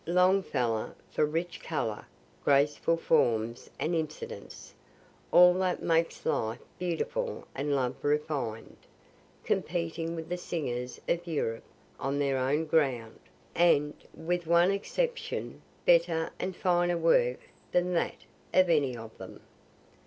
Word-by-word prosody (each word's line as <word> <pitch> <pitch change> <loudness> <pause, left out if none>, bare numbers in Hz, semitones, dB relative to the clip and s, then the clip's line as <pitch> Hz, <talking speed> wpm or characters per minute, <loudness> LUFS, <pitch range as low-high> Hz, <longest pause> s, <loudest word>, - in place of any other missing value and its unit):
Longfellow 180 - +2 0.2
for 150 - +2
rich 170 +3 -3
color, 115 -9 -3 0.4
graceful 145 +4 +3
forms 115 -6 +1
and 165 - 0
incidents 460 - -5 0.6
all 180 0 +8
that 185 0 -1
makes 165 0 +1
life 110 +1 0 0.2
beautiful 180 - -2
and 140 +1 -1
love 130 -2 0
refined 145 -6 -2 0.7
competing 165 -1 -2
with 160 -1 -6
the 180 - -2
singers 125 -8 -4
of 175 +1 0
Europe 115 -8 -2 0.3
on 135 +1 -1
their 140 -2 +1
own 145 +5 +1
ground, 130 -8 0 0.3
and, 150 -4 +3 0.2
with 175 +1 -2
one 170 +3 +5
exception, 475 - -2 0.2
better 170 -1 +3
and 185 -1 -3
finer 175 -1 +2
work 125 -7 +3 0.3
than 180 0 +1
that 170 - -1 0.3
of 185 -2 +5
any 140 -6 +2
of 115 -1 -10
them. - - -9
160 Hz, 120 wpm, -29 LUFS, 135-175 Hz, 0.7 s, all